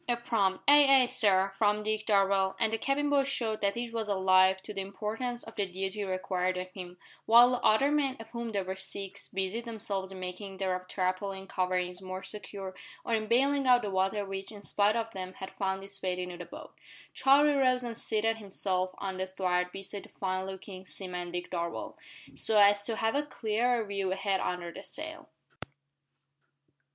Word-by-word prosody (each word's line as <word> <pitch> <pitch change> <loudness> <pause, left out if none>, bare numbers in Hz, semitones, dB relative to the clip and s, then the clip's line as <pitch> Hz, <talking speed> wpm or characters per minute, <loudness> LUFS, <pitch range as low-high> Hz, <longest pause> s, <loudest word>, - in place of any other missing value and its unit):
A 240 - +2
prompt 200 -5 0
"Ay, 280 -2 +7
ay, - - +4
sir" 195 -5 +5
from 210 0 +2
Dick 215 0 -2
Darvall 195 -2 +3
and 225 -1 +1
the 225 - 0
cabin 280 +3 0
boy 280 -1 +4
showed 235 -5 -1
that 200 +2 0
each 235 -1 -4
was 225 -2 -2
alive 190 -1 +4
to 210 - -7
the 195 - -3
importance 220 +5 -4
of 225 - -11
the 205 -2 -1
duty 190 +3 -3
required 185 -1 -1
of 185 0 -5
him, 180 -1 -9 0.3
while 240 +2 +8
the 250 - 0
other 270 +7 +4
men 280 -3 +1
of 225 - -9
whom 235 -1 -5
there 200 -2 -1
were 190 +1 -4
six 195 +1 -6
busied 195 +5 -3
themselves 200 -4 -3
in 190 - -8
making 185 +2 -6
the 185 -1 -1
tarpaulin 190 +1 -2
coverings 180 -1 -1
more 185 0 -6
secure, 195 -2 -7 0.3
or 235 - -1
in 215 -1 0
baling 275 +4 +3
out 245 -1 +6
the 205 - -3
water 190 +2 0
which, 195 +1 -6
in 205 -2 -11
spite 205 +2 +2
of 225 -1 -2
them, 185 -2 -6
had 190 - -8
found 190 -1 -2
its 195 0 -6
way 180 -1 -1
into 180 -1 -4
the 175 0 -8
boat. - - -11 0.4
Charlie 280 +3 +5
rose 255 -2 +2
and 235 -1 -4
seated 225 0 0
himself 185 -3 -2
on 190 -1 -4
the 185 0 -2
thwart 180 -1 -1
beside 195 +1 -6
the - - -15
fine 185 0 -3
looking 190 0 -8
seaman 180 -2 -5
Dick 175 0 -5
Darvall, 170 -1 -4 0.4
so 215 -1 +2
as 205 0 +6
to 230 - -1
have 225 0 0
a 285 - +2
clearer 235 -3 0
view 200 -2 -2
ahead 195 0 0
under 175 -1 -3
the - - -8
sail. - - -8
200 Hz, 195 wpm, -30 LUFS, 190-225 Hz, 0.4 s, while